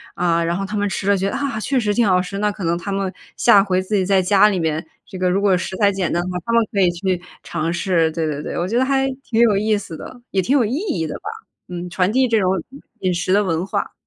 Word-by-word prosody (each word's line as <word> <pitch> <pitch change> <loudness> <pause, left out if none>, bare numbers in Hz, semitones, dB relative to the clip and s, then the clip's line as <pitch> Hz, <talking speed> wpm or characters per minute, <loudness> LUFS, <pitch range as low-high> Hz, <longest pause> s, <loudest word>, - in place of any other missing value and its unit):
啊， 170 -1 +1
然 170 +1 0
后 195 - -2
他 210 +2 -4
们 205 0 +1
吃 195 +1 -3
了 200 - +5
觉 195 +1 0
得， - - -4
啊， 275 -6 -2
确 265 +4 0
实 210 -3 0
挺 230 0 +2
好 180 -1 +4
吃， 195 +2 -6
那 210 0 +1
可 200 -1 -8
能 170 0 +1
他 190 +4 -5
们 195 -1 -1 0.2
下 205 -5 +5
回 185 -2 0
自 205 +3 -2
己 190 - +2
在 195 0 +3
家 200 +2 +5
里 190 -3 -1
面， 160 -1 -1 0.2
这 190 - -9
个 185 - +2
如 190 +2 +1
果 200 -2 +4
食 185 - -4
材 205 -2 +4
简 190 -3 -2
单 175 - +1
的 185 - -4
话， 180 - -3
他 230 - -1
们 230 0 +5
可 200 - -1
以 180 - +5
去 180 +1 -2 0.2
尝 165 0 -2
试， 170 -3 +1
对 165 0 -2
对 150 -1 -3
对。 - - -5
我 175 - -1
觉 225 +5 0
得 260 - +3
还 270 0 +1 0.2
挺 230 -1 0
有 225 -4 +5
意 215 +1 +2
思 175 -5 -7
的， 245 - -10
也 195 - +2
挺 265 +10 +2
有 250 - +3
意 230 +5 -2
义 295 - -2
的 - - -5
吧。 410 - -6 0.4
嗯， 180 0 -5
传 180 +2 +1
递 260 +2 +3
这 230 -2 +2
种， 185 -2 +2 0.2
嗯， 275 - -11 0.2
饮 185 -1 0
食 180 +1 -2
的 205 - +4
文 170 -2 -1
化。 - - -3
195 Hz, 320 characters per minute, -20 LUFS, 180-210 Hz, 0.4 s, 了